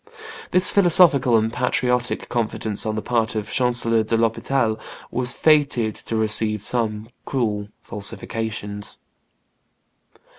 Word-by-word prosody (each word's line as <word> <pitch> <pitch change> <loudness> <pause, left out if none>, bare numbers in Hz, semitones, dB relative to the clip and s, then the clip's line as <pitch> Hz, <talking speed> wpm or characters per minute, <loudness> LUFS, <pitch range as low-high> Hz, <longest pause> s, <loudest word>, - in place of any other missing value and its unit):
'" - - -12
This 180 0 +4
philosophical 165 - +5
and 110 +1 0
patriotic 125 0 0
confidence 110 -2 -1
on 110 - -1
the 110 - -4
part 115 -2 0
of 105 -1 -4
Chancellor 120 -2 +1
de 110 +1 0
l'Hospital 115 0 0 0.3
was 125 +1 +2
fated 140 -8 +2
to 115 - -6
receive 110 -1 +1
some 110 -1 -2
cruel 105 -6 -2 0.2
falsifications. 105 -1 -5
115 Hz, 115 wpm, -22 LUFS, 110-125 Hz, 0.3 s, philosophical